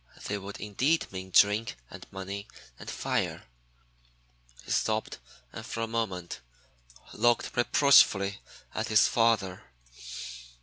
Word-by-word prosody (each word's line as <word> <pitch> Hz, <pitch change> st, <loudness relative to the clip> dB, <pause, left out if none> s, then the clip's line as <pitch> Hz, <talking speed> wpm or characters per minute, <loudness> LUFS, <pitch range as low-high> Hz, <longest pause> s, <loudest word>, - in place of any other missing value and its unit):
They 100 Hz, 0 st, -2 dB
would 100 Hz, +1 st, -8 dB
indeed 130 Hz, +10 st, +1 dB
mean 95 Hz, 0 st, -7 dB
'drink 105 Hz, -, +3 dB
and -, -, -11 dB
money 100 Hz, +1 st, -6 dB, 0.3 s
and -, -, -9 dB
fire.'" -, -, -2 dB, 1.2 s
He -, -, -7 dB
stopped 110 Hz, 0 st, 0 dB, 0.3 s
and -, -, -7 dB
for 115 Hz, -, -5 dB
a 115 Hz, -, -1 dB
moment 95 Hz, -, -3 dB, 0.7 s
looked 120 Hz, +2 st, +1 dB
reproachfully 115 Hz, -6 st, +4 dB, 0.3 s
at 110 Hz, -, -2 dB
his 110 Hz, -2 st, +5 dB
father. 110 Hz, -5 st, +1 dB
105 Hz, 115 wpm, -29 LUFS, 95-115 Hz, 1.2 s, his